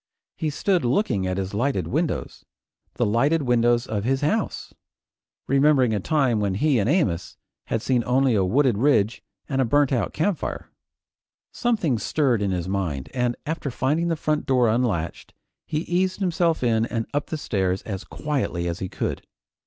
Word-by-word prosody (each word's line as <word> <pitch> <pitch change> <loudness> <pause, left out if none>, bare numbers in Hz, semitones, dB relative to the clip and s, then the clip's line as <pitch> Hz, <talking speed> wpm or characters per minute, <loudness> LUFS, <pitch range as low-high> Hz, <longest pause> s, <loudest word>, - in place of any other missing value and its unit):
He 155 - -2
stood 180 +3 +1
looking 120 - +1
at 95 0 -2
his 95 0 -3
lighted 130 +7 0
windows, 160 +2 -2 0.5
the - - +1
lighted 140 +9 +2
windows 120 -1 +2
of 105 -2 -3
his 135 +3 0
house, 205 +9 -1 0.7
remembering 135 -3 +3
a 105 - 0
time 130 - +1
when 100 -2 0
he 135 +3 +2
and 105 +3 +1
Amos 110 - 0 0.3
had 115 0 -1
seen 125 -3 +1
only 130 0 +3
a 100 -3 +3
wooded 120 +2 +2
ridge 115 -5 +2 0.3
and 135 -2 0
a - - +4
burnt 145 +4 +2
out 125 - 0
campfire. 165 +3 -2 0.8
Something 185 - 0
stirred 125 0 +1
in 100 - 0
his 90 -2 -2
mind, 80 -9 -2
and 125 -1 0
after 155 -1 -3
finding 145 +7 0
the 165 - +1
front 155 -1 -1
door 125 -3 +3
unlatched, 110 -8 -1 0.3
he 150 - -1
eased 185 +2 0
himself 170 -5 +1
in 115 -1 +2
and 115 -2 -2
up 145 0 -1
the 160 - -3
stairs 95 -9 -1
as 100 -2 -5
quietly 135 - -2
as 85 0 -3
he 95 - -4
could. - - -3
125 Hz, 170 wpm, -24 LUFS, 105-150 Hz, 0.8 s, a